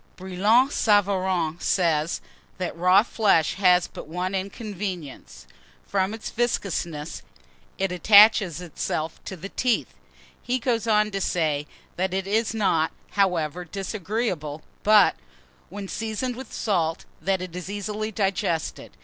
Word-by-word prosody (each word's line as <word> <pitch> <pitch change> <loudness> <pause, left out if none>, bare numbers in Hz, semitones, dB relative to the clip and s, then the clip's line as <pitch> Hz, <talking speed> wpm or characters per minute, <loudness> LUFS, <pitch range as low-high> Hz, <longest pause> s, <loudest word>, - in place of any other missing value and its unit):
BRILLAT 205 +8 +2
SAVARIN 190 - +1
says, 165 -4 +1 0.4
that 185 -2 -3
raw 180 +4 +5
flesh 200 -9 +2
has 180 -2 +5
but - - -10
one 180 +4 -3
inconvenience, 195 - -5 0.4
from 195 +2 0
its 225 - -7
viscousness 175 -9 -2 0.6
it 195 -1 -1
attaches 200 -1 +6
itself 160 -1 -4
to 190 - -5
the 190 +4 -7
teeth. 245 +1 0 0.5
He 250 +1 -1
goes 235 -2 -1
on 215 -1 +3
to 195 -1 -3
say, 150 -5 0 0.3
that 185 +1 -1
it 190 0 -1
is 220 +3 0
not, 165 -7 +2 0.2
however, 180 -4 0
disagreeable; 185 -4 -3 0.2
but, 210 -1 +5 0.5
when 200 +1 -7
seasoned 225 +4 -3
with 260 +2 -9
salt, 165 -6 -1 0.2
that 195 0 0
it 180 -1 -7
is 180 +1 -6
easily 210 +2 -3
digested. 190 -5 -2
190 Hz, 125 wpm, -25 LUFS, 175-215 Hz, 0.6 s, attaches